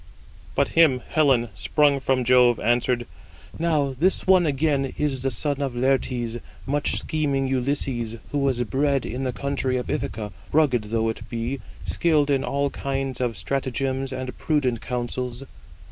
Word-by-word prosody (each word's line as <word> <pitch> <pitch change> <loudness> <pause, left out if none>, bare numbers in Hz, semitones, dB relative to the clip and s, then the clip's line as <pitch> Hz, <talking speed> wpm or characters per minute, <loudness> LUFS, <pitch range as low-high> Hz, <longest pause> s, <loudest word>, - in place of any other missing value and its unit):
But - - +2
him 150 -7 +4
Helen, 135 -7 +3
sprung 140 +9 +2
from 130 -1 +1
Jove, 125 -1 +5
answered: 120 +1 +1 0.5
"Now, 150 -5 +1
this 185 +3 +2
one 185 -3 +5
again 140 -1 +1
is 140 -4 -1
the 135 - +1
son 140 +4 -2
of 135 -3 -2
Laertes, 125 -2 0 0.3
much 145 +2 0
scheming 140 -3 0
Ulysses, 130 -3 -1 0.2
who 145 - 0
was 130 -3 +1
bred 135 +3 +1
in 130 +3 -3
the 130 - 0
country 135 -1 -1
of 125 - -3
Ithaca, 105 -1 -3 0.2
rugged 135 -8 +3
though 115 +1 0
it 110 - -6
be, 120 +3 -3 0.3
skilled 150 -4 +2
in 135 -1 +2
all 140 0 0
kinds 135 -2 -3
of 120 -4 -1
stratagems 135 0 -2
and 130 -1 -5
prudent 130 -7 0
counsels." 125 +1 -3
135 Hz, 150 wpm, -24 LUFS, 125-140 Hz, 0.5 s, Jove